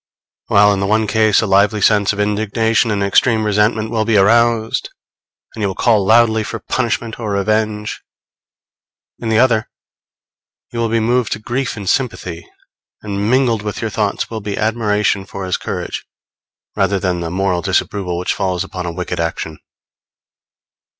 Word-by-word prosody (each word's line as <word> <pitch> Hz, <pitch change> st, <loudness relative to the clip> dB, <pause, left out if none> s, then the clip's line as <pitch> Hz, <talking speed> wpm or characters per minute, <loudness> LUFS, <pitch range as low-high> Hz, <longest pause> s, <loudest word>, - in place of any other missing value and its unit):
While 105 Hz, 0 st, +5 dB
in 100 Hz, -, -2 dB
the 95 Hz, -, -1 dB
one 110 Hz, +2 st, +2 dB
case 110 Hz, -1 st, +3 dB
a -, -, 0 dB
lively 100 Hz, +2 st, +3 dB
sense 105 Hz, 0 st, +3 dB
of 100 Hz, -, -6 dB
indignation 110 Hz, +2 st, +1 dB
and 100 Hz, -2 st, 0 dB
extreme 110 Hz, +3 st, +2 dB
resentment 105 Hz, +1 st, +1 dB
will 110 Hz, -2 st, +1 dB
be 110 Hz, -1 st, +2 dB
aroused, 115 Hz, +2 st, +2 dB, 0.6 s
and 110 Hz, -, -7 dB
you 100 Hz, -, +1 dB
will 95 Hz, -, -4 dB
call 110 Hz, -3 st, +3 dB
loudly 110 Hz, +1 st, +4 dB
for -, -, -5 dB
punishment 115 Hz, -2 st, -2 dB
or 110 Hz, -3 st, -4 dB
revenge, 105 Hz, +1 st, -1 dB, 1.2 s
in 115 Hz, -, -4 dB
the 110 Hz, -, +2 dB
other 115 Hz, -3 st, +3 dB, 1.0 s
you 115 Hz, -, -5 dB
will 115 Hz, -1 st, 0 dB
be 115 Hz, +1 st, +1 dB
moved 120 Hz, +1 st, +1 dB
to 105 Hz, -, -6 dB
grief 120 Hz, +2 st, -3 dB
and 100 Hz, -2 st, -7 dB
sympathy; 90 Hz, -8 st, -2 dB, 0.6 s
and 100 Hz, 0 st, -2 dB
mingled 125 Hz, -4 st, +2 dB
with 105 Hz, 0 st, -5 dB
your 115 Hz, -2 st, -3 dB
thoughts 100 Hz, 0 st, -1 dB
will 110 Hz, -1 st, -6 dB
be 100 Hz, 0 st, -4 dB
admiration 105 Hz, -3 st, 0 dB
for 95 Hz, 0 st, -7 dB
his 90 Hz, -, 0 dB
courage, -, -, -5 dB, 0.7 s
rather 100 Hz, -, +1 dB
than 90 Hz, -2 st, -1 dB
the 85 Hz, -1 st, -3 dB
moral 90 Hz, 0 st, 0 dB
disapproval 90 Hz, 0 st, -1 dB
which 90 Hz, -, -1 dB
follows 95 Hz, -3 st, -1 dB
upon 90 Hz, -2 st, -6 dB
a -, -, -2 dB
wicked 90 Hz, 0 st, -4 dB
action. 80 Hz, -1 st, -3 dB
105 Hz, 165 wpm, -17 LUFS, 100-110 Hz, 1.2 s, While